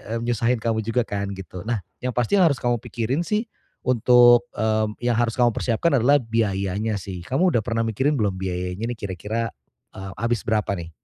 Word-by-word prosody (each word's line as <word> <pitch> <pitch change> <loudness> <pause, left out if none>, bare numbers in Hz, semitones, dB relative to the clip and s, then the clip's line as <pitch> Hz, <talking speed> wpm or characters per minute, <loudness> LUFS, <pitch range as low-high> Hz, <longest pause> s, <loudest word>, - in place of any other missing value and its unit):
mmm, 115 - -3
nyusahin 120 +1 +1
kamu 110 -1 0
juga 115 +2 +1
kan 100 -1 -3
gitu. 95 -1 -8
Nah 120 -2 0 0.2
yang 125 - -1
pasti 125 - +1
harus 165 -7 +4
kamu 120 -1 0
pikirin 125 +6 -2
sih 215 +5 -1 0.4
untuk, 120 0 +6
mmm, 110 0 0
yang 120 0 +2
harus 115 -1 +1
kamu 120 -1 +4
persiapkan 135 +6 +1
adalah 140 +5 +5
biayanya 105 -2 -1
sih, 90 -2 -7
kamu 170 - +2
udah 115 - +3
pernah 115 -2 0
mikirin 130 +7 +1
belum 100 -3 +1
biayanya 90 +3 -3
nih - - -13
kira-kira, 105 +4 -3 0.4
eee, 95 0 -7
habis 115 -1 0
berapa 105 -2 +1
nih? 85 -1 -7
115 Hz, 185 wpm, -23 LUFS, 100-120 Hz, 0.4 s, untuk